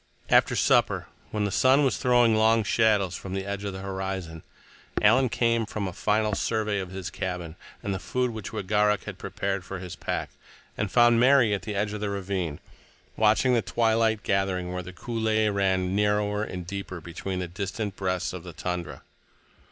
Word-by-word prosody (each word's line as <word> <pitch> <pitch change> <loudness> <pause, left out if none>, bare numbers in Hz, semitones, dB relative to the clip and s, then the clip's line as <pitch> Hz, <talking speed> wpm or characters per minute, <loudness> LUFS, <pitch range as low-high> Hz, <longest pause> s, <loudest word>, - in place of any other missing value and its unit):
After - - +5
supper, - - +3 0.2
when 105 -1 -2
the 100 - 0
sun 130 +6 +4
was 135 - +2
throwing 120 -3 +4
long 110 +1 +4
shadows 105 -3 +2
from 95 +1 -6
the 95 0 -3
edge 100 0 -4
of 100 - -3
the 95 0 -7
horizon, 95 -4 -4 0.6
Alan 125 +5 +4
came 115 0 +1
from 105 -2 -3
a 90 - -5
final 105 +3 +1
survey 105 -1 0
of 95 -2 -5
his 95 -1 -6
cabin 90 -3 -4 0.3
and 100 - -2
the 95 - -3
food 125 +7 -1
which 110 -2 -7
Wegaruk 105 +1 +1
had - - -8
prepared 95 -1 -3
for 95 +1 -6
his 90 -2 -7
pack, - - -3 0.4
and 100 - -2
found 120 -1 +5
Mary 125 -3 +5
at 100 - -1
the 105 -2 -5
edge 105 +1 -1
of 105 - -5
the 105 - -1
ravine, 95 -6 -3 0.6
watching 110 +4 +3
the 120 - +3
twilight 110 -2 +1
gathering 95 -2 0
where 90 - -3
the 90 +1 -9
coulée 110 +1 0
ran 95 -1 +1
narrower 105 0 +1
and 90 -4 -6
deeper 95 -1 -6
between 85 +3 -5
the 90 -1 -3
distant 100 +3 -4
breasts 95 -1 -2
of 90 - -6
the 90 0 -10
tundra. 90 0 -5
100 Hz, 185 wpm, -26 LUFS, 95-110 Hz, 0.6 s, After